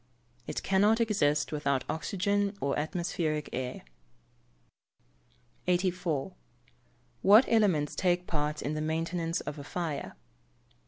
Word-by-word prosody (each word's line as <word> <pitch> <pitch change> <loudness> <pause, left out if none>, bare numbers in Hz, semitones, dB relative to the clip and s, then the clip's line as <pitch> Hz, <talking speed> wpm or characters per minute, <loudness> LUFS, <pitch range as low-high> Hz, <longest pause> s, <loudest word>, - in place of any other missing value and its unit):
It - - -4
cannot 205 +4 +3
exist 150 -10 +1
without 140 -3 0
oxygen 200 +5 -1
or 140 0 0
atmospheric 155 -2 -2
air. 125 0 -4 1.8
84. 180 -3 0 0.9
_What 215 +6 +8
elements 190 -10 +2
take 180 -1 +1
part 150 -2 -2
in 145 - -2
the 155 - -2
maintenance 165 +2 -1
of 150 - -6
a - - -7
fire? 160 -1 -4
165 Hz, 105 wpm, -30 LUFS, 150-190 Hz, 1.8 s, What